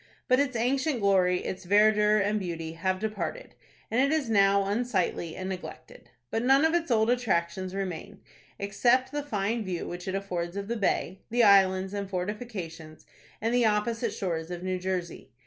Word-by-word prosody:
But 255 +1 +4
its 280 -3 0
ancient 260 +3 0
glory, 185 -3 +3
its 185 - -4
verdure 210 +2 +4
and 210 +1 +1
beauty, 165 -4 -4
have 185 +3 -1
departed, 215 - -4 0.4
and 235 +3 +3
it 280 +2 +2
is 300 -7 0
now 200 -1 +4
unsightly 195 -6 -1
and 185 - -5
neglected. 185 -1 -8 0.2
None 265 +6 +4
of 320 - +2
its 340 -2 0
old 225 -1 +3
attractions 190 -5 -1
remain, 185 -4 -5 0.4
except 240 +6 +2
the 295 0 -2
fine 225 -4 -2
view 185 -3 -4
which 175 +1 -7
it 190 - -2
affords 180 -2 -3
of 200 0 -4
the 235 - -1
bay, 195 -3 -1
the 240 +1 +3
islands, 190 -2 +4
and 200 -1 -4
fortifications, 180 -5 -6 0.4
and 225 +2 0
the 245 -2 +4
opposite 225 +3 0
shores 165 -3 -3
of 175 0 -6
New 185 0 -2
Jersey. 180 -8 -4
200 Hz, 170 wpm, -28 LUFS, 185-235 Hz, 0.4 s, But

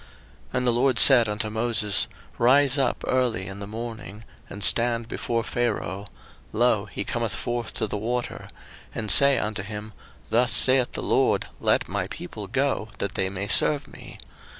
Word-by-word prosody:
02:008:020 - - -22 0.5
And 125 - -1
the - - +4
LORD 125 +1 +1
said 120 -5 +7
unto 105 +1 -3
Moses, 110 -2 0 0.3
Rise 135 +3 +4
up 130 -3 -1
early 120 -6 -1
in 95 +1 -8
the 100 - -7
morning, 110 -1 -8 0.3
and 100 0 -6
stand 115 +1 +4
before 115 -1 -3
Pharaoh; 100 -6 -3 0.4
lo, 110 -2 +1
he 100 0 -6
cometh 115 0 -3
forth 120 -1 -4
to 110 - -1
the 105 - -5
water; 120 +3 -4 0.5
and 110 -2 -2
say 140 +6 +6
unto 105 -2 -3
him, 105 +1 -8 0.4
Thus 120 +1 +2
saith 130 -1 +5
the - - -5
LORD, - - 0
Let - - +1
my - - -3
people - - -9
go, - - -1
that - - -4
they 95 - -1
may 100 +1 -5
serve 145 +6 +2
me. - - -13
115 Hz, 170 wpm, -24 LUFS, 105-120 Hz, 0.5 s, said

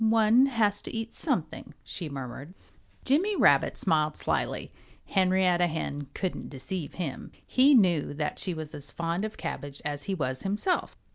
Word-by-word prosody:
"One 225 +3 +5
has 215 -6 +1
to - - -7
eat 225 0 -4
something," - - -3
she 170 -5 -6
murmured. 140 +4 -7 0.5
Jimmy 355 +11 +2
Rabbit - - +4
smiled 155 -4 +1
slyly. - - -1 0.3
Henrietta 185 - +3
Hen 145 -3 -4
couldn't 185 -2 -3
deceive 145 +4 -5
him. 165 -7 -5
He 270 +3 +5
knew 180 - +3
that 150 0 -2
she 180 - -1
was 155 -1 -6
as 145 - -7
fond 170 +4 -2
of 215 - -6
cabbage 145 -1 -5
as 145 -1 -3
he 195 - -1
was 130 -6 -2
himself. 210 - -1
180 Hz, 155 wpm, -28 LUFS, 150-215 Hz, 0.5 s, One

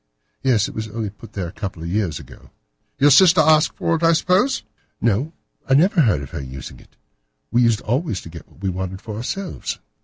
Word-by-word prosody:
"Yes, 120 -6 +2
it - - -9
was 110 0 -4
only 110 -1 -4
put 110 +3 -14
there 95 -3 -3
a - - -8
couple 95 -5 -6
of - - -5
years 90 -5 -1
ago." - - -14 0.5
"Your 145 +1 +5
sister 180 +5 +7
asked 155 0 +4
for - - 0
it, 165 - -3
I 165 0 +5
suppose?" 185 - +2 0.4
"No, 120 +7 +1 0.4
I 135 - +5
never 170 +4 +4
heard 105 - +2
of 70 - -10
her - - -5
using 65 0 -9
it. - - -21 0.6
We 120 - +3
used 115 -3 +3
always 125 - -1
to - - -11
get 85 0 -11
what - - -21
we 95 - +1
wanted 95 +1 -4
for 110 0 -7
ourselves." 180 - -4
110 Hz, 215 wpm, -21 LUFS, 95-155 Hz, 0.6 s, sister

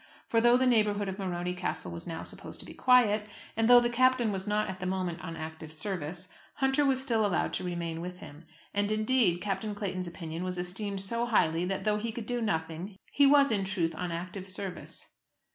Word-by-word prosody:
For, 230 - +3
though 240 +1 +6
the 260 - +2
neighbourhood 210 -4 +3
of 190 +1 -6
Morony 180 -2 -2
Castle 180 - -4
was 85 - -7
now 165 -1 -4
supposed - - -10
to - - -10
be - - -10
quiet, 220 -5 +4 0.3
and 225 +1 +2
though 245 0 +10
the 240 - +2
Captain 255 -2 +3
was 190 0 -4
not 210 +1 +1
at 190 -1 -5
the 185 - -3
moment 185 -2 -2
on 165 -2 -6
active 160 0 -7
service, 175 +1 -4 0.3
Hunter 270 +1 +2
was 265 -1 +2
still 235 -5 +1
allowed 200 -5 +1
to - - -2
remain 170 -2 -3
with 180 +1 -6
him. 155 -1 -12 0.3
And, 205 +1 +1
indeed, 215 -5 +2
Captain 210 +1 -2
Clayton's 185 -3 -3
opinion 165 0 -5
was 185 0 -3
esteemed 190 +3 -3
so 230 +5 -1
highly, 170 -6 +2
that, 190 +1 -2
though 210 -1 +2
he 225 +2 -3
could 230 -1 -6
do 245 +1 -2
nothing, 175 -1 -2
he 280 0 +5
was 280 -1 +6
in 200 -3 +1
truth 180 -4 -1
on 175 +2 -4
active 185 +3 -5
service. 185 -2 -6
195 Hz, 210 wpm, -30 LUFS, 175-225 Hz, 0.3 s, though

